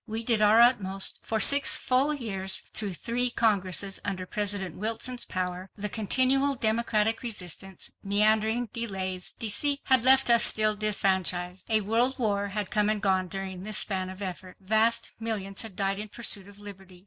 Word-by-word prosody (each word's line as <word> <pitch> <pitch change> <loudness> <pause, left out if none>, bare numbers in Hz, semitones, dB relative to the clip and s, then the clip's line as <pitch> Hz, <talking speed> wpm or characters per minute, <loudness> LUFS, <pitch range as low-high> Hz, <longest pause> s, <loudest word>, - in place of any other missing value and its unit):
We 225 +1 -4
did 225 -2 +2
our 215 +2 +4
utmost. 200 -6 +2
For 220 - -3
six 280 +6 +6
full 265 +4 +1
years, 195 -9 -3
through 200 -4 -5
three 245 +7 -2
Congresses 200 -4 0
under 185 -2 -5
President 200 -3 -3
Wilson's 230 +4 -4
power, 185 0 -5
the 210 0 -5
continual 260 +7 +2
Democratic 220 -1 0
resistance, 195 -5 -5
meandering, 220 +3 +1
delays, 190 -5 -4
deceits 280 +6 -1
had 260 -3 +4
left 260 0 +5
us 235 - +5
still 215 0 +4
disfranchised. 190 -3 +1
A 220 -1 +4
world 230 +6 +1
war 205 -5 -2
had 200 -1 -5
come 210 0 +1
and 215 -1 -1
gone 190 -2 0
during 190 0 -7
this 215 +2 -1
span 185 -2 -1
of 190 +2 -9
effort. 185 0 -8
Vast 220 +4 +1
millions 205 -4 -3
had 220 -5 -3
died 195 0 -2
in 215 - -6
pursuit 205 -3 -1
of 205 0 -14
liberty. 195 -3 -12
210 Hz, 165 wpm, -26 LUFS, 190-230 Hz, -, six